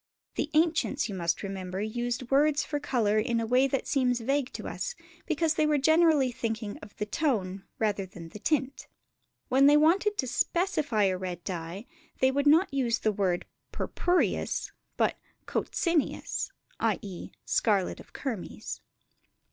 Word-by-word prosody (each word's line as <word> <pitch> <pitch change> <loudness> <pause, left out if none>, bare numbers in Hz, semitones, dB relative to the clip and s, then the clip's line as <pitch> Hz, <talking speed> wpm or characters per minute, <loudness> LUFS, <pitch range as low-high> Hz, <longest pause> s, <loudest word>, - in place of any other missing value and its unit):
The 300 - -2
ancients, 315 -3 +2
you - - -4
must 170 -2 -1
remember, 190 -1 -4
used 240 +4 -3
words 290 +2 +4
for 290 - -3
colours 215 -7 +1
in 235 -1 0
a 230 - -1
way 250 +4 +4
that 270 0 -1
seems 250 -3 +1
vague 270 +3 0
to - - -6
us, 485 -1 -4 0.3
because 320 -1 +1
they 310 -1 +2
were 300 -1 +3
generally 315 -2 +4
thinking 225 -3 -4
of 210 - -13
the 210 - -2
tone 205 - -1
rather 205 -3 0
than 170 -3 -10
the 210 - -10
tint. 275 +1 -1 0.6
When 270 +2 +5
they 295 +1 +7
wanted 380 +7 +3
to 260 - 0
specify 290 - +1
a 185 -2 +1
red 180 -2 -5
dye 175 +3 -5 0.3
they 260 0 +4
would 285 +2 +1
not 320 +3 +5
use 245 -4 +1
the 215 - +1
word 190 -4 0 0.3
purpureus, 355 0 0 0.3
but - - +1 0.3
coccineus, 335 -4 -1 0.3
i.e. 205 -4 -2 0.2
scarlet 200 -5 +1
of - - -14
kermes. 235 -10 -5
245 Hz, 155 wpm, -29 LUFS, 205-295 Hz, 0.6 s, they